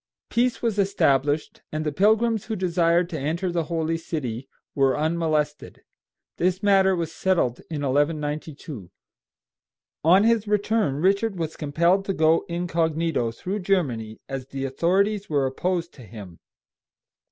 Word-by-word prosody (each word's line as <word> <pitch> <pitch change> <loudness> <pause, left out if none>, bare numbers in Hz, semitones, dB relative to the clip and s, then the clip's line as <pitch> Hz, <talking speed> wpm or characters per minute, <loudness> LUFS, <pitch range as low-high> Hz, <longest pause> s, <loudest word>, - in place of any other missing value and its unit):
Peace 240 +1 +1
was 220 -3 0
established, 145 -7 +1
and 155 0 -3
the 150 - 0
pilgrims 220 +5 +2
who 220 - -3
desired 175 -2 +2
to 160 - -3
enter 165 +6 -2
the 170 -2 -1
holy 165 0 -1
city 130 -7 -5 0.2
were 135 -1 +2
unmolested. 155 -2 -1 0.5
This 185 +3 0
matter 190 -2 +4
was 165 -2 -3
settled 170 -12 0
in 150 -3 -4
1192. 145 - -2 1.1
On 180 +6 +6
his 225 -1 +2
return 210 -6 +1
Richard 195 +6 +1
was 160 -2 -3
compelled 170 +6 +1
to 195 - -1
go 160 -1 +3
incog. 170 -2 -1 0.4
through 195 - -4
Germany, 135 - -1
as 135 -1 -5
the 135 0 -4
authorities 195 +9 +1
were 145 -3 +1
opposed 170 +6 -2
to 130 - -14
him. 100 -5 -11
165 Hz, 135 wpm, -24 LUFS, 145-190 Hz, 1.1 s, On